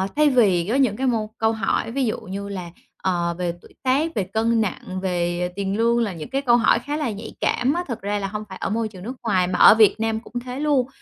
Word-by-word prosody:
thay 300 0 +4
vì 200 -10 +3
có 235 - +1
những 255 -7 +2
cái 265 - 0
mâu 220 -3 0
câu 220 0 +2
hỏi 220 +1 -1
ví 270 +1 0
dụ 215 - -1
như 200 -1 -6
là, 180 -3 -6 0.3
ờ, 175 -2 -1
về 175 -2 -2
tuổi - - -18
tác, 280 +5 +2
về 205 - +1
cân 225 +4 +1
nặng, 185 -2 -3
về 175 -1 -1
tiền 200 0 -2
lương 235 +1 +3
là 215 -5 0
những 155 -3 -8
cái 275 - -1
câu 240 -3 +4
hỏi 230 - +3
khá 295 +1 -4
là 290 -7 -1
nhạy 210 +2 -8
cảm 260 +3 +1
á, 350 +2 -1
thật 235 - -5
ra 205 +1 -1
là 195 - -2
hông 210 +2 -5
phải 190 - -8
ở - - -1
môi 220 +2 -1
trường 185 -4 -11
nước 240 +5 -5
ngoài 185 -5 +2
mà 180 - -2
ở - - +9
Việt 220 -1 +5
Nam 225 0 0
cũng 235 - -16
thế 250 +2 -7
luôn. 285 -4 +2
220 Hz, 265 wpm, -22 LUFS, 190-245 Hz, 0.3 s, ở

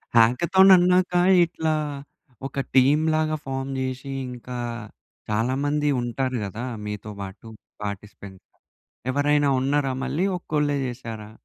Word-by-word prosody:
Hackathon 170 +12 +5
అన్నాక 180 0 +3 0.3
ఇట్లా 160 -2 -2 0.7
ఒక 135 0 -3
టీమ్‌లాగా 155 +4 +3
ఫార్మ్ 135 0 -3
జేసి 130 +1 -4 0.2
ఇంకా 125 0 -7 0.7
చాలా 115 +4 0
మంది 150 0 +1
ఉంటారు 130 +1 -2
గదా! 110 +5 -5 0.2
మీతో 105 0 -6
బాటు 95 +3 -9 0.4
పార్టిసిపెంట్. 100 -1 -8 0.7
ఎవరైనా 145 +1 +2
ఉన్నారా 135 0 +1
మళ్ళీ 150 +9 0
ఒక్కోళ్ళే 150 -3 0
చేసారా? 115 -4 -7
135 Hz, 105 wpm, -24 LUFS, 115-150 Hz, 0.7 s, Hackathon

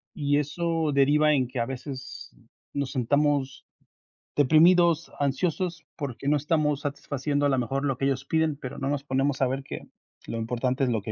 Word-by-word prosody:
y 145 -1 +1
eso 160 +1 -1
deriva 150 +2 +4
en 130 -2 +1
que 125 0 -5
a 115 - 0
veces 130 0 -7 0.4
nos 140 -2 -2
sintamos 140 +1 +1 0.7
deprimidos, 165 +3 +5
ansiosos, 165 +4 -1
porque 140 -1 -3
no 150 - +4
estamos 150 -1 +1
satisfaciendo 145 0 -2
a - - +3
lo 135 - +2
mejor 135 +3 -1
lo 135 -3 0
que 135 - -1
ellos 135 0 0
piden, 160 0 +1
pero 130 -3 -7
no 135 - -2
nos 140 -1 -1
ponemos 135 0 0
a 130 - +4
ver 135 +2 -3
que - - -8 0.4
lo 115 - -4
importante 125 +4 -1
es - - 0
lo 115 -3 0
que 105 - -5
140 Hz, 185 wpm, -26 LUFS, 130-150 Hz, 0.7 s, deprimidos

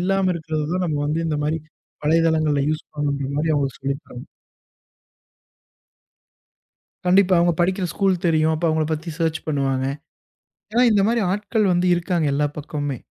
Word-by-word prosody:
இல்லாம 190 0 +1
இருக்கிறதுதான், 160 +2 -2
நம்ம 150 -3 -1
வந்து 155 +2 0
இந்த 150 -2 -1
மாரி 155 +2 0 0.5
வலைதளங்கள்ல 155 -2 +2
யூஸ் 155 - -3
பண்ணனும்ன்ற 140 -2 -2
மாதிரி, 155 +1 +1
அவங்களுக்கு 140 -2 -1
சொல்லித்தரணும். 135 -2 -5 2.8
கண்டிப்பா. 185 +1 +4
அவுங்க 175 0 +3
படிக்கிற 185 +1 +1
ஸ்கூல் 195 -2 +2
தெரியும். 160 -1 +3
அப்ப 165 +2 0
அவங்கள 155 0 +1
பத்தி 160 +2 -5
சேர்ச் 160 -1 0
பண்ணுவாங்க. 135 -3 0 0.9
ஏன்னா 240 +2 +3
இந்த 205 -2 +4
மாரி 235 +1 +2
ஆட்கள் 210 0 0
வந்து 175 +1 +1
இருக்காங்க 175 -2 0
எல்லா 145 +1 +1
பக்கமும்மே. 145 -3 -4
160 Hz, 135 wpm, -22 LUFS, 150-180 Hz, 2.8 s, கண்டிப்பா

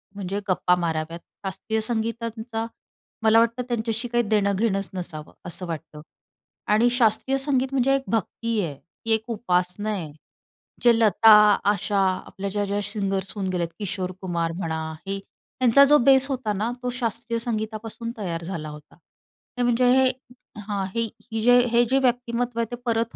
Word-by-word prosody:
म्हणजे 200 0 -3
गप्पा 180 -1 +3
माराव्यात. 165 -1 -2 0.3
शास्त्रीय 205 +3 -2
संगीतांचा 225 0 -3 0.6
मला 220 +1 +6
वाटतं 235 +2 +1
त्यांच्याशी 230 0 -1
काही 240 0 +1
देणं-घेणंच 200 -1 +1
नसावं, 160 -5 -7
असं 180 +2 -6
वाटतं 155 -2 -7 0.7
आणि 225 +3 +4
शास्त्रीय 245 +2 +2
संगीत 270 -1 +1
म्हणजे 270 0 +3
एक 270 - -1
भक्ती 230 +1 -1
आहे. 160 -6 -3 0.3
ती 225 - -1
एक 220 0 +1
उपासना 185 -1 -1
आहे. 180 -8 -3 0.7
जे 240 -1 +7
लता, 220 0 +6 0.3
आशा 200 0 +1 0.3
आपल्या 195 +1 -5
ज्या-ज्या 205 0 -1
सिंगरर्स 195 -2 -2
होऊन 195 -2 -2
गेले 180 -2 -1
आहेत. 165 - -5
किशोर 195 -3 -3
कुमार 170 -3 -1
म्हणा, 165 -3 -2 0.3
हे 195 - -1 0.5
यांचा 255 +2 +7
जो 295 +2 +6
बेस 270 0 +6
होता 255 -6 -1
ना, 215 +4 -1
तो 250 - -1
शास्त्रीय 235 -1 -3
संगीतापासून 225 0 -4
तयार 170 -5 -4
झाला 165 -4 -5
होता. 150 -1 -12 0.6
हे 245 - +1
म्हणजे 245 +1 +2
हे 265 -1 +5 0.5
हां, 200 -2 -3
ही 230 0 +1 0.3
हे 225 0 -2
जे 245 +2 +6
हे 235 0 +5
जे 265 - +3
व्यक्तिमत्त्व 245 -2 0
आहे 230 - +2
ते - - -2
परत 230 -1 0
220 Hz, 160 wpm, -24 LUFS, 190-235 Hz, 0.7 s, जे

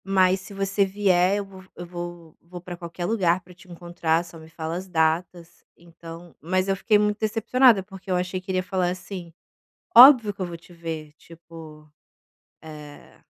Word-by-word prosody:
Mas 190 -1 +2
se 200 - -12
você 195 0 0
vier, 190 -1 +2
eu 205 - -4
vou 190 -1 -14
eu 175 - -8
vou 175 -2 -9
vou 175 +1 -11
pra 180 0 -8
qualquer 170 0 -7
lugar 185 -4 +1
pra 180 - -17
te 180 +1 -19
encontrar, 170 -1 -2
só 170 -1 -13
me 160 0 -14
fala 160 0 -5
as 185 +2 -6
datas, 170 0 -2
então 170 0 -13
mas 185 +4 -1
eu 195 - +1
fiquei 210 +2 +2
muito 210 0 0
decepcionada, 225 0 +3
porque 195 0 -13
eu 185 - +1
achei 185 +1 -3
que 185 - -19
ele 185 - -1
ia - - -3
falar 185 -2 -1
assim: 185 -1 -7 0.7
"óbvio 245 -4 +9
que 200 - -19
eu 185 - -1
vou 170 -1 -7
te 170 +2 -19
ver", 160 -3 -7
tipo, 160 -2 -14 0.8
eh, 150 -2 -13
180 Hz, 190 wpm, -24 LUFS, 170-195 Hz, 0.8 s, óbvio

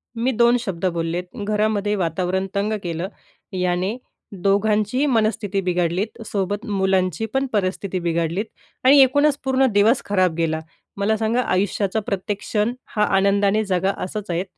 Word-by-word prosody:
मी 240 +3 0
दोन 235 +1 +4
शब्द 190 -6 -4
बोललेत, 170 +1 -2 0.2
घरामध्ये 210 -1 +1
वातावरण 185 +2 -1
तंग 205 +2 0
केलं. 170 +1 -3 0.5
याने 180 +4 -1 0.5
दोघांचीही 210 +6 +2
मनस्थिती 215 -6 +1
बिघडली, 180 +1 0 0.2
सोबत 205 +2 -2
मुलांची 190 -2 0
पण 270 0 +1
परिस्थिती 190 -1 -1
बिघडली 170 +2 -1 0.4
आणि 275 +3 +7
एकूणच 285 +2 +3
पूर्ण 265 0 +3
दिवस 215 +5 +4
खराब 185 -4 +2
गेला. 160 -1 0 0.4
मला 215 +2 +1
सांगा, 225 +3 +1
आयुष्याचा 200 +1 0
प्रत्येक 200 +1 -2
क्षण 215 +3 -1 0.2
हा 210 - +3
आनंदाने 200 +2 +2
जगा 190 0 +1
असंच 195 +1 -5
आहे, 170 +2 0
200 Hz, 135 wpm, -22 LUFS, 185-220 Hz, 0.5 s, आणि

